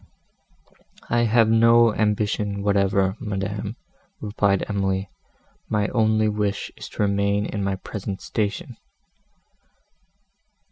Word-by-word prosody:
"I 120 0 +3
have 115 0 +4
no 115 0 +5
ambition 105 -1 0
whatever, 100 -1 +2
madam," 105 -1 -4 0.4
replied 100 -2 0
Emily, 95 -1 -1 0.6
"my 105 -1 +1
only 110 -2 +2
wish 105 -1 -2
is - - -9
to - - -2
remain 100 0 +1
in 105 -2 -3
my 95 0 0
present 95 0 -6
station." 115 +6 -3
105 Hz, 100 wpm, -23 LUFS, 100-110 Hz, 0.6 s, no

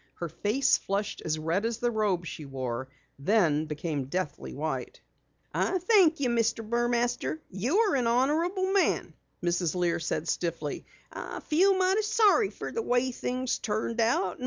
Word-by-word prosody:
Her 170 - -4
face 215 - +2
flushed 200 +1 -3
as 155 -1 -1
red 165 +6 -1
as 230 0 -1
the 240 0 0
robe 205 -6 0
she 160 - -6
wore, 130 -2 -4 0.3
then 160 -3 +2
became 150 -2 -3
deathly 155 +1 -4
white. 155 +3 -4 0.5
"I 375 - +1
thank 360 -4 +4
you, 260 -3 +1
Mr. 230 -1 0
Burmaster, 240 +4 0
you're 315 - +1
an 250 -3 +1
honorable 330 - +1
man," 395 - +1 0.3
Mrs. 175 -1 0
Lear 175 -1 +1
said 160 0 -2
stiffly. 165 -4 -3 0.3
"I - - -6
feel 375 +5 +3
mighty 380 +3 +3
sorry 425 -1 +4
fer - - -7
the 460 - -2
way 250 - +1
things 255 +1 -2
turned 220 +2 -1
out. 210 -5 +1
225 Hz, 155 wpm, -28 LUFS, 170-285 Hz, 0.5 s, thank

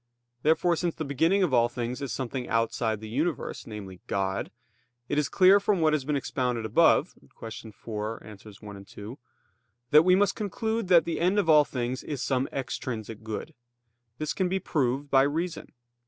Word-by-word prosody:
Therefore, 160 +4 +3
since 170 0 -2
the 160 - -4
beginning 165 +8 +2
of 165 -8 0
all 120 -1 +4
things 120 +2 -4
is 140 - -4
something 130 -1 -4
outside 115 -1 0
the 110 - -7
universe, 145 +6 -2
namely, 100 -5 -8
God, 95 0 -1 0.6
it 145 - 0
is 145 -2 0
clear 190 +1 +6
from 200 -1 +1
what 155 -1 +3
has 145 -4 0
been 150 +1 0
expounded 125 -4 -2
above 160 - +4
(Q. - - -24 0.4
44, 110 +1 -6
AA. 110 - -10 0.3
1, 100 -2 -10
2), 105 +6 -10 0.7
that 150 - +8
we 180 +2 +5
must 200 +1 +2
conclude 220 +1 -2
that 170 -3 +6
the 165 -2 -2
end 180 +4 +2
of 200 -5 +2
all 150 -1 +7
things 125 -1 -3
is 140 -4 -4
some 130 0 0
extrinsic 115 -4 -5
good. 110 +8 -6 0.6
This 155 +2 -2
can 185 -2 0
be 190 - 0
proved 140 -5 -1
by 135 - +6
reason. 160 +5 -2
140 Hz, 180 wpm, -27 LUFS, 115-170 Hz, 0.7 s, that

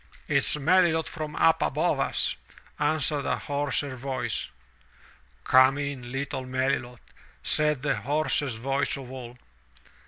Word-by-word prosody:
"It's 140 -1 +4
MeUlot, 160 +2 +3
from 155 -2 -6
up 165 - +3
above - - 0
us," - - 0 0.4
answered 150 -1 +1
a - - 0
hoarser 140 -1 -1
voice. 130 +1 -3 0.9
"Come 130 +2 +5
in, 140 -4 -5
little 135 0 -3
Melilot," 130 -1 -2 0.4
said 150 -3 +2
the 145 - 0
hoarsest 140 +1 0
voice 135 +5 0
of 130 -2 -9
all. 125 -2 -9
140 Hz, 120 wpm, -26 LUFS, 130-150 Hz, 0.9 s, Come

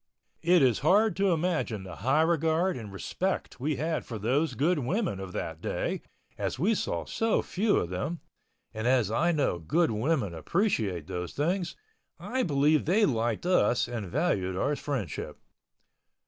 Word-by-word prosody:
It 175 -2 +5
is 125 -5 +3
hard 205 +8 +4
to 195 -1 +3
imagine 160 - -1
the 90 -2 -9
high 135 +7 +3
regard 165 +2 +2
and 110 -5 -7
respect 185 - -3
we 145 +4 0
had 160 +3 -1
for 115 - -6
those 130 +10 0
good 160 +4 +2
women 155 - -1
of 95 -1 -6
that 80 0 -4
day, - - -2 0.4
as - - -2
we 190 - +2
saw - - -2
so 225 -1 0
few 205 +3 +1
of 85 - -1
them—and 110 - -6
as 125 -5 +3
I 170 +9 +2
know 145 - 0
good 160 - +1
women 110 - 0
appreciate 100 - 0
those 90 +2 -5
things, 175 +4 -1 0.4
I 260 +1 -2
believe 150 - +2
they 200 +7 +4
liked 115 - 0
us 125 -10 +3
and 115 -5 -4
valued 95 - 0
our 145 +8 +1
friendship. 130 - -4
145 Hz, 160 wpm, -28 LUFS, 110-175 Hz, 0.4 s, It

